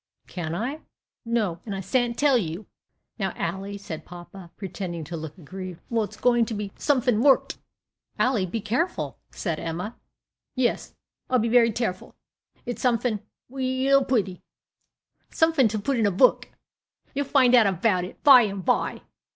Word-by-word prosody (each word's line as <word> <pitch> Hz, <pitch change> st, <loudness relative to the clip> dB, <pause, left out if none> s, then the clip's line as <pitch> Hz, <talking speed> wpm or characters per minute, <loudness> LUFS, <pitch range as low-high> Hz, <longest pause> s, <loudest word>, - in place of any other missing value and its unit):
"Can't 165 Hz, -2 st, -5 dB
I?" 265 Hz, -, -3 dB, 0.4 s
"No, 215 Hz, -7 st, 0 dB
and 205 Hz, -3 st, -5 dB
I -, -, -4 dB
s'ant 235 Hz, +5 st, 0 dB
tell 285 Hz, -1 st, +4 dB
you." 185 Hz, -2 st, -2 dB, 0.5 s
"Now, 190 Hz, -2 st, -1 dB
Ally," 190 Hz, +4 st, -4 dB
said 170 Hz, -6 st, -7 dB
papa, 175 Hz, +1 st, -11 dB
pretending 185 Hz, -4 st, -5 dB
to 170 Hz, +3 st, -7 dB
look 160 Hz, +1 st, -7 dB
aggrieved. 185 Hz, +1 st, -8 dB
"Well, 230 Hz, -1 st, +2 dB
it's -, -, -13 dB
going 240 Hz, -2 st, +3 dB
to 225 Hz, -, -4 dB
be 205 Hz, -1 st, -4 dB
somefin 250 Hz, -6 st, +1 dB
worked." 275 Hz, 0 st, +3 dB, 0.6 s
"Ally, 240 Hz, -7 st, +2 dB
be 210 Hz, +5 st, -4 dB
careful," 245 Hz, -, -2 dB
said 165 Hz, -5 st, -3 dB
Emma. 175 Hz, +7 st, -4 dB, 0.6 s
"Yes, 255 Hz, -2 st, -1 dB, 0.3 s
I'll 255 Hz, -, +3 dB
be 230 Hz, -1 st, +1 dB
very 230 Hz, -1 st, +5 dB
tareful; 215 Hz, -5 st, -3 dB, 0.5 s
it's 245 Hz, -, -5 dB
somefin 235 Hz, -3 st, +1 dB, 0.3 s
weall 265 Hz, +1 st, +2 dB
pretty 205 Hz, -9 st, -1 dB, 0.9 s
somefin 320 Hz, -6 st, +3 dB
to 215 Hz, 0 st, -2 dB
put 245 Hz, +4 st, -1 dB
in 220 Hz, -, +3 dB
a -, -, +1 dB
book. 250 Hz, +8 st, +3 dB, 0.6 s
You'll 285 Hz, +1 st, -1 dB
find 255 Hz, -4 st, +4 dB
out 235 Hz, -4 st, +7 dB
about 190 Hz, 0 st, +1 dB
it 180 Hz, -, -10 dB
by 270 Hz, -4 st, +9 dB
and 200 Hz, -4 st, -3 dB
by." -, -, 0 dB
220 Hz, 160 wpm, -25 LUFS, 185-250 Hz, 0.9 s, by